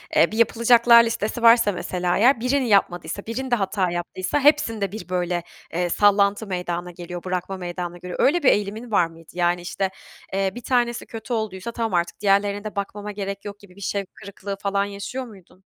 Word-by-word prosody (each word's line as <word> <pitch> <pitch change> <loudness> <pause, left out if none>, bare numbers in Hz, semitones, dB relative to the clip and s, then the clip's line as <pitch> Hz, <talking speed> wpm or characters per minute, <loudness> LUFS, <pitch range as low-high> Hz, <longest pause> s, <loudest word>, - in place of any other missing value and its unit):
Eee, 170 - +5
bir 220 - -4
yapılacaklar 235 0 +6
listesi 230 0 -2
varsa 230 -2 +6
mesela 180 -1 -1
eğer 240 +3 +5
birini 255 +1 +1
yapmadıysa, 200 -1 +1
birinde 245 +2 -1
hata 190 -3 0
yaptıysa 180 +9 -2
hepsinde 225 - +2
bir 190 -4 -8
böyle, 175 -1 -1 0.3
eee, 175 +1 0
sallantı 205 +2 +3
meydana 180 -1 -3
geliyor, 175 0 -8
bırakma 185 +1 -3
meydana 175 -1 -5
geliyor. 180 0 -7
Öyle 320 +3 +3
bir - - +6
eğilimin 210 +3 -1
var 180 -5 +4
mıydı? 165 -1 -17
Yani 175 0 +1
işte, 190 +2 -2 0.4
eee, 195 0 +1
1 245 - -7
tanesi 240 -2 0
kötü 225 +2 -6
olduysa 220 -1 -3
tamam 225 -4 -3
artık 170 0 -1
diğerlerine 200 0 +2
de 215 - -6
bakmama 205 +1 -4
gerek 200 0 -5
yok 205 0 -7
gibi 190 -3 -17
bir 200 - -14
şevk 200 -1 -3
kırıklığı 200 0 -7
falan 200 0 +1
yaşıyor 205 +6 -5
muydun? 195 -4 -17
200 Hz, 185 wpm, -23 LUFS, 180-225 Hz, 0.4 s, yapılacaklar